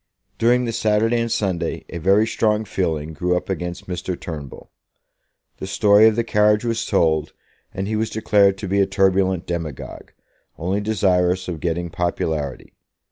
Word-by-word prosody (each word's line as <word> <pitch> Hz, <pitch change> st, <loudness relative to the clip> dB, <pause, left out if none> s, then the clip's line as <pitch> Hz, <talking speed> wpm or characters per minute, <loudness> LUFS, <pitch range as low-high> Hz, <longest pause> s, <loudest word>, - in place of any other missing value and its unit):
During 125 Hz, +2 st, +3 dB
the 115 Hz, -, -2 dB
Saturday 110 Hz, +1 st, +1 dB
and 115 Hz, 0 st, -2 dB
Sunday 90 Hz, -7 st, -2 dB
a 85 Hz, -, -6 dB
very 100 Hz, +6 st, +3 dB
strong 110 Hz, -1 st, 0 dB
feeling 80 Hz, -5 st, -2 dB
grew 90 Hz, +4 st, 0 dB
up 90 Hz, -, -4 dB
against 90 Hz, -1 st, -4 dB
Mr. 90 Hz, 0 st, -4 dB
Turnbull. 75 Hz, -5 st, -8 dB, 0.9 s
The -, -, -6 dB
story 105 Hz, +1 st, +5 dB
of 110 Hz, -, +3 dB
the 115 Hz, -, +1 dB
carriage 105 Hz, 0 st, +2 dB
was 115 Hz, -1 st, -1 dB
told, 80 Hz, -6 st, +1 dB, 0.4 s
and 95 Hz, +1 st, -4 dB
he 110 Hz, -, -1 dB
was 110 Hz, +1 st, -1 dB
declared 100 Hz, -3 st, +3 dB
to 95 Hz, -, -6 dB
be 100 Hz, +2 st, +1 dB
a 100 Hz, -, +3 dB
turbulent 95 Hz, -2 st, +1 dB
demagogue, 85 Hz, -5 st, -6 dB, 0.5 s
only 95 Hz, +5 st, -1 dB
desirous 95 Hz, -3 st, +1 dB
of 85 Hz, -3 st, -4 dB
getting 85 Hz, +1 st, -2 dB
popularity. 80 Hz, -6 st, -3 dB
95 Hz, 160 wpm, -21 LUFS, 85-105 Hz, 0.9 s, story